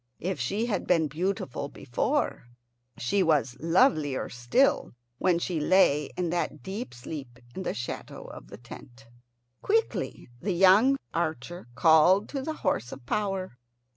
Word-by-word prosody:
If 185 Hz, -2 st, -3 dB
she 200 Hz, -, -1 dB
had 230 Hz, -4 st, -2 dB
been 165 Hz, -3 st, +3 dB
beautiful 150 Hz, -3 st, -3 dB
before, 125 Hz, -1 st, -2 dB, 0.5 s
she 190 Hz, +11 st, 0 dB
was 145 Hz, -8 st, +2 dB
lovelier 165 Hz, -, +2 dB
still 125 Hz, -, +1 dB, 0.3 s
when 180 Hz, -2 st, +3 dB
she 170 Hz, -1 st, -2 dB
lay 150 Hz, -3 st, +3 dB
in 175 Hz, -2 st, -1 dB
that 170 Hz, -4 st, -2 dB
deep 205 Hz, +6 st, -5 dB
sleep 120 Hz, 0 st, -8 dB, 0.2 s
in 190 Hz, -, -5 dB
the -, -, -3 dB
shadow 120 Hz, -, -6 dB
of -, -, -11 dB
the 100 Hz, -, -11 dB
tent. 120 Hz, 0 st, -13 dB, 0.6 s
Quickly 450 Hz, +2 st, -1 dB
the 190 Hz, +7 st, -1 dB
young 195 Hz, +10 st, +5 dB, 0.2 s
archer 165 Hz, -1 st, -3 dB
called 165 Hz, +7 st, +5 dB
to 275 Hz, -, -3 dB
the 315 Hz, +4 st, -3 dB
horse 120 Hz, -, 0 dB
of -, -, -10 dB
power. 195 Hz, -, -2 dB
170 Hz, 140 wpm, -27 LUFS, 135-195 Hz, 0.6 s, young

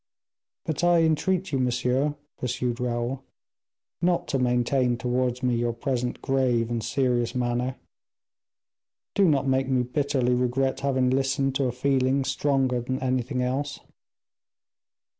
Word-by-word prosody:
"But 160 Hz, +1 st, -2 dB
I 175 Hz, -1 st, +5 dB
entreat 175 Hz, +4 st, +1 dB
you, 135 Hz, -, 0 dB
monsieur," 125 Hz, +3 st, +1 dB, 0.2 s
pursued 125 Hz, -1 st, -2 dB
Raoul, 125 Hz, +2 st, -2 dB, 0.8 s
"not 175 Hz, 0 st, +1 dB
to 135 Hz, -, 0 dB
maintain 125 Hz, 0 st, +1 dB
towards 125 Hz, +1 st, -1 dB
me 125 Hz, -1 st, +2 dB
your 120 Hz, 0 st, 0 dB
present 125 Hz, +1 st, -3 dB
grave 125 Hz, -4 st, +1 dB
and 115 Hz, -2 st, -2 dB
serious 125 Hz, -2 st, 0 dB
manner. 125 Hz, +1 st, -1 dB, 1.4 s
Do 200 Hz, -, +4 dB
not 140 Hz, -5 st, +2 dB
make 130 Hz, 0 st, +1 dB
me 130 Hz, -2 st, +2 dB
bitterly 130 Hz, -1 st, 0 dB
regret 125 Hz, +2 st, 0 dB
having 130 Hz, -2 st, +1 dB
listened 135 Hz, +1 st, +1 dB
to 140 Hz, -, +1 dB
a 125 Hz, -, 0 dB
feeling 130 Hz, +1 st, +1 dB
stronger 135 Hz, -2 st, +1 dB
than 130 Hz, +2 st, -2 dB
anything 130 Hz, 0 st, -1 dB
else." 140 Hz, +3 st, -2 dB
130 Hz, 130 wpm, -26 LUFS, 125-135 Hz, 1.4 s, I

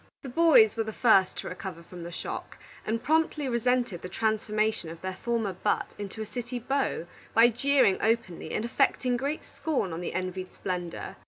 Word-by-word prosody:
The 270 Hz, -, -6 dB
boys 275 Hz, -7 st, +6 dB
were 225 Hz, -, 0 dB
the 220 Hz, -, -5 dB
first 205 Hz, -5 st, +4 dB
to -, -, -5 dB
recover 180 Hz, -2 st, -6 dB
from 175 Hz, +1 st, -10 dB
the 170 Hz, +1 st, -6 dB
shock, -, -, -6 dB, 0.3 s
and 225 Hz, +1 st, -1 dB
promptly 315 Hz, -2 st, +2 dB
resented 240 Hz, -5 st, +1 dB
the 180 Hz, -, -6 dB
transformation 215 Hz, -2 st, 0 dB
of 165 Hz, 0 st, -8 dB
their 185 Hz, 0 st, -3 dB
former 230 Hz, -5 st, 0 dB
butt 195 Hz, +3 st, -1 dB
into 205 Hz, +2 st, -5 dB
a -, -, -7 dB
city 240 Hz, +3 st, -5 dB
beau, 265 Hz, -6 st, -1 dB, 0.3 s
by 230 Hz, +1 st, +8 dB
jeering 255 Hz, -3 st, +3 dB
openly 220 Hz, -6 st, 0 dB
and 215 Hz, -, -1 dB
affecting 250 Hz, 0 st, +2 dB
great 280 Hz, +5 st, -2 dB
scorn 260 Hz, -, -2 dB
of 165 Hz, -, -4 dB
the 175 Hz, -, -4 dB
envied 185 Hz, 0 st, -3 dB
splendor. 180 Hz, -2 st, -4 dB
220 Hz, 180 wpm, -28 LUFS, 185-250 Hz, 0.3 s, by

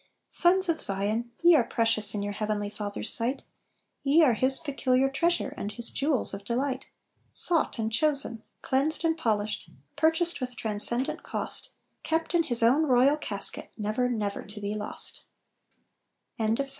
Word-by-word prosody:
"Sons 370 Hz, +2 st, +4 dB
of 330 Hz, -2 st, -1 dB
Zion, 210 Hz, +4 st, -2 dB
ye 345 Hz, -1 st, +7 dB
are 265 Hz, -, +4 dB
precious 220 Hz, -3 st, +2 dB
In 205 Hz, -, -3 dB
your 205 Hz, 0 st, -4 dB
heavenly 205 Hz, -1 st, -3 dB
Father's 210 Hz, 0 st, -2 dB
sight; 245 Hz, +4 st, -2 dB, 0.6 s
Ye 290 Hz, +4 st, +4 dB
are 260 Hz, -6 st, +4 dB
His 260 Hz, +4 st, +3 dB
peculiar 270 Hz, -4 st, 0 dB
treasure, 340 Hz, +5 st, 0 dB
And 205 Hz, -, -5 dB
His 235 Hz, +2 st, -1 dB
jewels 280 Hz, -6 st, -1 dB
of 195 Hz, 0 st, -7 dB
delight 255 Hz, +4 st, -3 dB, 0.5 s
"Sought 335 Hz, -6 st, +2 dB
and 220 Hz, -1 st, -2 dB
chosen, 280 Hz, -4 st, +1 dB, 0.2 s
cleansed 295 Hz, +5 st, 0 dB
and 325 Hz, 0 st, +1 dB
polished, 215 Hz, -, -2 dB, 0.3 s
Purchased 320 Hz, +1 st, +1 dB
with 250 Hz, -1 st, -5 dB
transcendent 225 Hz, +4 st, +4 dB
cost, -, -, -5 dB, 0.3 s
Kept 325 Hz, +1 st, -2 dB
in 345 Hz, -, +3 dB
His 240 Hz, -7 st, +1 dB
own 280 Hz, +7 st, +3 dB
royal 260 Hz, +3 st, +4 dB
casket, 300 Hz, -, -1 dB
Never, 215 Hz, +4 st, -1 dB
never 210 Hz, -4 st, -3 dB
to 210 Hz, 0 st, -10 dB
be 205 Hz, 0 st, -4 dB
lost." 210 Hz, -1 st, -4 dB
250 Hz, 150 wpm, -27 LUFS, 215-305 Hz, 0.6 s, ye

